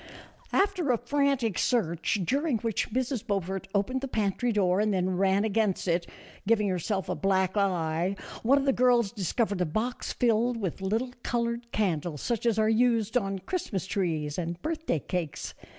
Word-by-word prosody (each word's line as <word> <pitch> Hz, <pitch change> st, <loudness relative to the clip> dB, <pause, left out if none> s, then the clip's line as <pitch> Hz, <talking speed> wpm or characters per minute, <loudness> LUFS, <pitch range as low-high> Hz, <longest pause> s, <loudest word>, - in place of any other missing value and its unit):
After 380 Hz, -7 st, +2 dB
a 240 Hz, -, +3 dB
frantic 265 Hz, -3 st, 0 dB
search, 190 Hz, -4 st, +1 dB
during 280 Hz, -, +1 dB
which 225 Hz, -1 st, -1 dB
Mrs. 250 Hz, 0 st, -1 dB
Beau 200 Hz, -1 st, +2 dB
fort 190 Hz, +1 st, -5 dB
opened 255 Hz, +7 st, 0 dB
the 275 Hz, -, -3 dB
pantry 220 Hz, +1 st, 0 dB
door 190 Hz, -3 st, +2 dB
and 215 Hz, 0 st, +2 dB
then 185 Hz, -1 st, 0 dB
ran 195 Hz, +2 st, +2 dB
against 215 Hz, -3 st, 0 dB
it, 170 Hz, 0 st, +1 dB, 0.4 s
giving 210 Hz, -2 st, +3 dB
herself 190 Hz, +1 st, -1 dB
a 180 Hz, -, -1 dB
black 190 Hz, -1 st, +1 dB
eye, 180 Hz, -2 st, +1 dB, 0.3 s
one 265 Hz, +5 st, +4 dB
of 280 Hz, -, +1 dB
the 270 Hz, -, +3 dB
girls 245 Hz, -5 st, +3 dB
discovered 205 Hz, -1 st, -1 dB
a -, -, +3 dB
box 220 Hz, +10 st, -2 dB
filled 235 Hz, 0 st, +2 dB
with 195 Hz, -4 st, -3 dB
little 225 Hz, +6 st, -1 dB
colored 235 Hz, 0 st, -2 dB
candles 170 Hz, -7 st, -1 dB
such 235 Hz, -1 st, -1 dB
as 225 Hz, -2 st, +2 dB
are 215 Hz, 0 st, +3 dB
used 225 Hz, -1 st, +2 dB
on 195 Hz, -5 st, +1 dB
Christmas 220 Hz, -, -2 dB
trees 160 Hz, -6 st, -1 dB
and 170 Hz, 0 st, -3 dB
birthday 320 Hz, -, -1 dB
cakes. 165 Hz, +1 st, -4 dB
210 Hz, 170 wpm, -28 LUFS, 185-240 Hz, 0.4 s, one